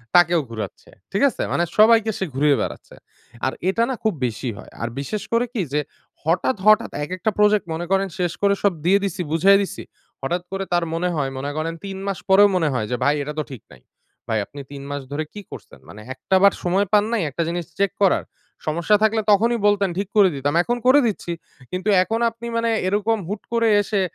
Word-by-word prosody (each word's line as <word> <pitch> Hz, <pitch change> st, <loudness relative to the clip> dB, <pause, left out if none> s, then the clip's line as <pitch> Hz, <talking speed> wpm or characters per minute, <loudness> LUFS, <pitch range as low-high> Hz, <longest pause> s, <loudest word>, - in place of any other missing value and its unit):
তাকেও 175 Hz, -1 st, +5 dB
ঘুরাচ্ছে। 110 Hz, -4 st, -7 dB, 0.2 s
ঠিক 200 Hz, -, 0 dB
আছে? -, -, -7 dB
মানে 175 Hz, -, +1 dB
সবাইকে 220 Hz, 0 st, +5 dB
সে 190 Hz, -, -1 dB
ঘুরিয়ে 145 Hz, +1 st, +3 dB
বেড়াচ্ছে। -, -, -6 dB, 0.5 s
আর 130 Hz, -, 0 dB, 0.2 s
এটা 230 Hz, +4 st, +1 dB
না 260 Hz, -, -1 dB
খুব 220 Hz, -2 st, +2 dB
বেশি 120 Hz, +1 st, -3 dB
হয়। -, -, -12 dB
আর 115 Hz, -, -2 dB
বিশেষ 205 Hz, +9 st, -4 dB
করে 235 Hz, +1 st, +3 dB
কি 225 Hz, -, -1 dB
যে, 150 Hz, -, +2 dB, 0.4 s
হঠাৎ, 175 Hz, -, +1 dB
হঠাৎ 215 Hz, +2 st, +5 dB
একেকটা 185 Hz, +7 st, -2 dB
প্রজেক্ট 210 Hz, -1 st, +4 dB
মনে 170 Hz, +2 st, -3 dB
করেন 195 Hz, 0 st, +2 dB
শেষ 175 Hz, -2 st, 0 dB
করে 200 Hz, 0 st, +4 dB
সব 200 Hz, -3 st, +3 dB
দিয়ে 195 Hz, +3 st, +5 dB
দিছি, 190 Hz, -2 st, -2 dB
বুঝায়ে 195 Hz, +5 st, +5 dB
দিছি। 195 Hz, -, -5 dB, 0.4 s
হঠাৎ 175 Hz, +6 st, -2 dB
করে 195 Hz, 0 st, -2 dB
তার 175 Hz, -, +2 dB
মনে 180 Hz, +2 st, 0 dB
হয়, 140 Hz, -3 st, -1 dB
মনে 140 Hz, +2 st, -3 dB
করেন 165 Hz, +1 st, -2 dB
৩ 195 Hz, -1 st, -5 dB
মাস 195 Hz, -4 st, -2 dB
পরেও 200 Hz, +2 st, +7 dB
মনে 160 Hz, -4 st, +2 dB
হয় 115 Hz, -4 st, -1 dB
যে, -, -, +1 dB
"ভাই 145 Hz, -, +3 dB
এটা 150 Hz, -, -5 dB
তো 155 Hz, -, 0 dB
ঠিক 125 Hz, -6 st, -8 dB
নাই।" -, -, -17 dB, 0.5 s
ভাই 110 Hz, -, +1 dB
আপনি 140 Hz, +5 st, -10 dB
৩ 140 Hz, -1 st, -8 dB
মাস 145 Hz, 0 st, -3 dB
ধরে 155 Hz, +2 st, -2 dB
কি 210 Hz, -, -7 dB
করছেন? -, -, -11 dB
মানে 105 Hz, -, -11 dB
একটা 130 Hz, +8 st, -1 dB
বার 200 Hz, -, +7 dB
সময় 190 Hz, +3 st, +2 dB
পান 205 Hz, -, +6 dB
নাই 230 Hz, -, +1 dB
একটা 165 Hz, +5 st, -2 dB
জিনিস 175 Hz, 0 st, -3 dB
চেক 200 Hz, -1 st, +2 dB
করার? 190 Hz, -, +3 dB, 0.4 s
সমস্যা 170 Hz, +7 st, +2 dB
থাকলে 220 Hz, 0 st, +3 dB
তখনই 230 Hz, +4 st, +3 dB
বলতেন 200 Hz, -1 st, +2 dB
ঠিক 200 Hz, 0 st, -2 dB
করে 195 Hz, -3 st, +7 dB
দিতাম। 140 Hz, +1 st, -1 dB
এখন 240 Hz, +5 st, -1 dB
করে 280 Hz, +3 st, +7 dB
দিচ্ছি। 190 Hz, -5 st, -3 dB, 0.4 s
কিন্তু 185 Hz, +3 st, -2 dB
এখন 225 Hz, +4 st, -2 dB
আপনি 230 Hz, +1 st, -9 dB
মানে 230 Hz, 0 st, +1 dB, 0.2 s
এরকম 210 Hz, +3 st, +1 dB
হুট 205 Hz, +3 st, -4 dB
করে 230 Hz, -1 st, +3 dB
এসে 205 Hz, -1 st, -1 dB
190 Hz, 215 wpm, -22 LUFS, 155-210 Hz, 0.5 s, পরেও